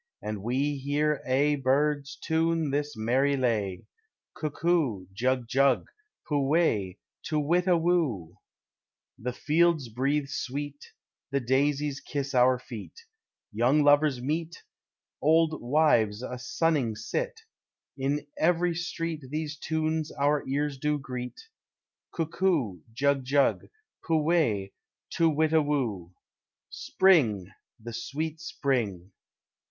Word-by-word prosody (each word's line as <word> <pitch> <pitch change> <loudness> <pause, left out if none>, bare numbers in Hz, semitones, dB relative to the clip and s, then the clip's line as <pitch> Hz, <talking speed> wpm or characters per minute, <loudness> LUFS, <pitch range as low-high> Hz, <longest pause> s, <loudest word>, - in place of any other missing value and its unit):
And 105 -2 -5
we 135 +6 0
hear 145 +2 0
aye 140 +2 +2
birds 145 +2 +1
tune 165 -2 0
this 145 -2 -2
merry 130 +6 +2
lay, 105 -8 -1 0.5
Cuckoo, 150 - 0
jug 125 +3 0
jug, 135 +1 +3 0.4
pu 145 -3 +1
we, 105 - +1 0.3
to 155 0 0
witta 175 +4 +2
woo! 145 - 0 0.8
The 125 +2 -3
fields 155 0 +2
breathe 140 +5 0
sweet, 145 0 -5 0.5
the 140 0 0
daisies 140 +2 0
kiss 140 -1 -4
our 125 0 +5
feet, 125 - -10 0.5
Young 125 +7 +3
lovers 145 -2 +4
meet, 160 +4 -3 0.6
old 160 +1 +3
wives 120 -5 +2
a 125 0 -5
sunning 135 -3 0
sit, 460 - -3 0.5
In 140 +2 -1
every 175 +1 +2
street 165 -3 -4
these 150 0 -3
tunes 160 0 -2
our 145 +1 +1
ears 140 0 -1
do 150 +1 0
greet, 125 -2 -6 0.7
Cuckoo, 160 - 0
jug 140 +3 +1
jug, 140 +2 +2 0.4
pu 165 - 0
we, 150 - +1 0.4
to 165 -1 +3
witta 160 +1 +3
woo! 115 - -2 0.6
Spring! 125 - +3 0.3
the 115 +1 -8
sweet 155 +6 -4
spring! 110 - -2
145 Hz, 110 wpm, -28 LUFS, 125-155 Hz, 0.8 s, our